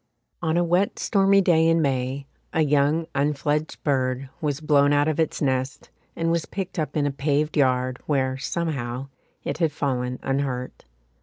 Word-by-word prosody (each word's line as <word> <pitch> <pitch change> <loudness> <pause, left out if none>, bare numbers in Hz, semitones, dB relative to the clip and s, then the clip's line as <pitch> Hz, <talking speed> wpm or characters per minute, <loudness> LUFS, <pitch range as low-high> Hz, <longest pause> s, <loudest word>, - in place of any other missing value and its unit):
On 160 -1 +1
a 175 - +3
wet 175 +4 +1
stormy 195 -1 +3
day 165 -3 +4
in 165 0 +4
May 135 -1 -1 0.3
a 160 - +3
young 150 +2 +2
unfledged 150 +2 -1
bird 130 -2 0
was 145 -2 -1
blown 145 -2 +3
out 145 +1 +3
of 155 0 -1
its 160 -1 0
nest 130 0 -2 0.2
and 165 0 0
was 170 -2 0
picked 190 -2 -5
up 155 0 -2
in 145 - +2
a 145 - +1
paved 145 +2 0
yard 130 -3 +1
where, 130 -3 +1
somehow, 135 -3 -3 0.3
it - - -3
had 165 -3 +2
fallen 125 -3 -2
unhurt. 135 - -3
145 Hz, 165 wpm, -24 LUFS, 135-160 Hz, 0.3 s, day